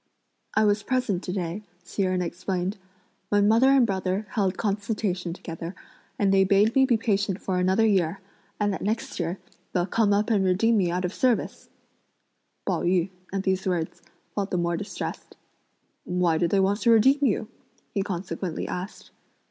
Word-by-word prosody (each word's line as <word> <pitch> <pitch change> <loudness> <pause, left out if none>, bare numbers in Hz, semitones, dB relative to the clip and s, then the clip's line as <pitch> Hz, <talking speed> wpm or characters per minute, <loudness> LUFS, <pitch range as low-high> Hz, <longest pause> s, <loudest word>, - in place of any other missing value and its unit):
"I 215 - +4
was 205 0 +2
present 250 -7 0
to 180 - -5
day," 180 +1 -3 0.2
Hsi 180 +3 -4
Jen 185 -1 +1
explained, 180 +3 -3 0.5
"when 205 0 +3
mother 230 +5 +5
and 270 -2 +5
brother 190 0 -1
held 195 -3 0
consultation 200 -4 -1
together, 165 +1 -7 0.4
and 195 -1 +2
they 195 0 +5
bade 200 +3 +3
me 265 0 +5
be 240 -3 +3
patient 205 -3 0
for 185 -1 -1
another 190 +5 +3
year, 190 -4 +2 0.4
and 205 -1 +1
that - - -5
next 220 0 -2
year 170 +2 -2 0.4
they'll 175 -1 +1
come 205 +2 +2
up 210 +3 +2
and 200 -3 +3
redeem 195 +5 +3
me 185 -4 +2
out 180 +1 -1
of 180 - -3
service!" 250 -3 0 1.0
Pao - - 0
yü, 180 +1 +1 0.2
at 195 0 -2
these 190 0 0
words, 175 -1 -2 0.3
felt 200 -1 -2
the 180 - -1
more 170 0 0
distressed. 195 - -6 0.7
"Why 180 -3 +1
do 170 - +2
they 195 +3 +2
want 195 +3 +1
to 235 - +3
redeem 245 +5 +5
you?" 220 -3 +1 0.5
he 200 - 0
consequently 185 -2 -4
asked. 185 +3 -6
195 Hz, 170 wpm, -26 LUFS, 180-210 Hz, 1.0 s, mother